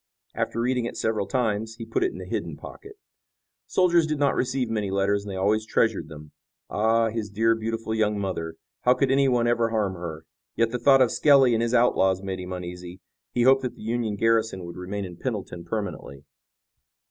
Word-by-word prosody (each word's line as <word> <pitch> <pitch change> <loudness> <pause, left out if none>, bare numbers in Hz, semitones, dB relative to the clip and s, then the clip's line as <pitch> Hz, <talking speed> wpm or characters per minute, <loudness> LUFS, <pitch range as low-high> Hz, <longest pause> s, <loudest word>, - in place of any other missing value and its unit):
After 115 - -2
reading 125 0 0
it - - -5
several 105 -3 -1
times 110 -1 -1
he 115 - -8
put 115 - -1
it 375 - +1
in - - -9
a - - -7
hidden - - -4
pocket. 415 0 -12 0.7
Soldiers 175 -3 +3
did 155 -1 -1
not 140 -1 +2
receive 125 0 -1
many 105 -3 -2
letters 100 +1 +1
and 100 - -7
they - - -5
always 105 +3 +1
treasured 110 -7 0
them. 75 -1 -11 0.4
Ah, 115 +2 +2
his 110 -2 -4
dear, 115 +3 +2
beautiful 115 0 -3
young 105 -1 +1
mother! 85 -5 -3 0.3
How 125 +1 +4
could 135 -1 +1
anyone 135 -3 +3
ever 120 -1 +2
harm 105 -4 0
her! 80 -3 -7 0.3
Yet 115 0 +1
the 125 - -2
thought 135 +1 +6
of 120 - 0
Skelly 135 -4 +5
and 115 - +1
his 115 +1 0
outlaws 95 -6 +3
made 95 -1 -4
him 90 0 -7
uneasy. 90 0 -7 0.3
He 120 - +1
hoped 135 +1 +5
that 125 -2 -4
the - - -12
Union 115 -1 -1
garrison 110 -4 +1
would 85 - -8
remain 95 +2 -5
in 90 -2 -9
Pendleton 95 -7 -5
permanently. 85 -8 -5
110 Hz, 200 wpm, -25 LUFS, 95-120 Hz, 0.7 s, thought